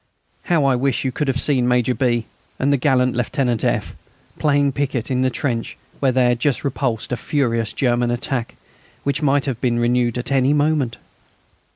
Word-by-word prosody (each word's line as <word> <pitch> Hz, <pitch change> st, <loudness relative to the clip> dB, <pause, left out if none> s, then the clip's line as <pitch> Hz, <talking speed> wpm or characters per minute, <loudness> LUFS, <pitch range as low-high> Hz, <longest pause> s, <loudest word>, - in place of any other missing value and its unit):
How 160 Hz, -5 st, +2 dB
I 135 Hz, -2 st, +3 dB
wish 135 Hz, +1 st, 0 dB
you 130 Hz, -, 0 dB
could 150 Hz, +3 st, -2 dB
have 130 Hz, -1 st, 0 dB
seen 130 Hz, -4 st, +2 dB
Major 125 Hz, 0 st, +2 dB
B. 120 Hz, -3 st, 0 dB, 0.3 s
and 140 Hz, +2 st, +1 dB
the -, -, +3 dB
gallant 125 Hz, -1 st, +2 dB
Lieutenant 120 Hz, -1 st, -1 dB
F. -, -, -1 dB, 0.5 s
playing 145 Hz, -2 st, +2 dB
piquet 135 Hz, -3 st, -2 dB
in 130 Hz, -1 st, 0 dB
the 130 Hz, -, +2 dB
trench 120 Hz, -2 st, -3 dB, 0.2 s
where 135 Hz, -2 st, +2 dB
they 130 Hz, 0 st, +2 dB
had 120 Hz, -1 st, 0 dB
just 140 Hz, 0 st, 0 dB
repulsed 130 Hz, -5 st, -2 dB
a -, -, +1 dB
furious 115 Hz, -5 st, -1 dB
German 120 Hz, -2 st, +1 dB
attack, 120 Hz, 0 st, -2 dB, 0.5 s
which 140 Hz, +1 st, -1 dB
might 140 Hz, -1 st, +2 dB
have 130 Hz, -4 st, -3 dB
been 120 Hz, -2 st, +1 dB
renewed 120 Hz, 0 st, +1 dB
at 125 Hz, +2 st, -4 dB
any 135 Hz, +1 st, +3 dB
moment! 145 Hz, -4 st, +1 dB
130 Hz, 185 wpm, -20 LUFS, 120-140 Hz, 0.5 s, I